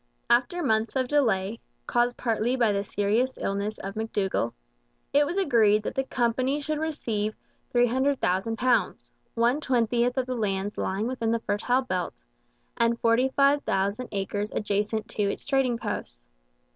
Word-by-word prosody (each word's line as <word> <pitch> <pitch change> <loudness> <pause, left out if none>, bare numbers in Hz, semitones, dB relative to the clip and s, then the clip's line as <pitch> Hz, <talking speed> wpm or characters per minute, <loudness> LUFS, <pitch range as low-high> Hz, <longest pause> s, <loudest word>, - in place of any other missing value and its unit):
After 345 +9 +2
months 220 -3 +1
of 260 -1 +1
delay, 225 -7 +1 0.3
caused 240 0 +1
partly 235 +1 0
by 235 -4 +3
the 200 0 0
serious 210 +6 0
illness 200 +2 -2
of 195 0 -6
McDougall, 200 - -1 0.6
it 290 +1 +4
was 350 - -3
agreed 220 - +3
that - - -3
the 270 - 0
company 255 +2 0
should 300 +1 -2
receive 225 -9 -2 0.4
£300,000, 245 -2 +1 0.2
one 240 +5 +2
twentieth 245 -1 +1
of 260 - +1
the 255 - -3
lands 205 -3 -2
lying 195 +3 -1
within 240 -2 -2
the 230 0 +1
Fertile 245 +6 0
Belt, 185 -7 -3 0.5
and 235 0 +2
45,000 250 -3 +2
acres 205 +1 -2
adjacent 210 +1 -1
to - - -3
its - - -7
trading 270 -4 +1
posts. - - -5
230 Hz, 140 wpm, -26 LUFS, 205-260 Hz, 0.6 s, it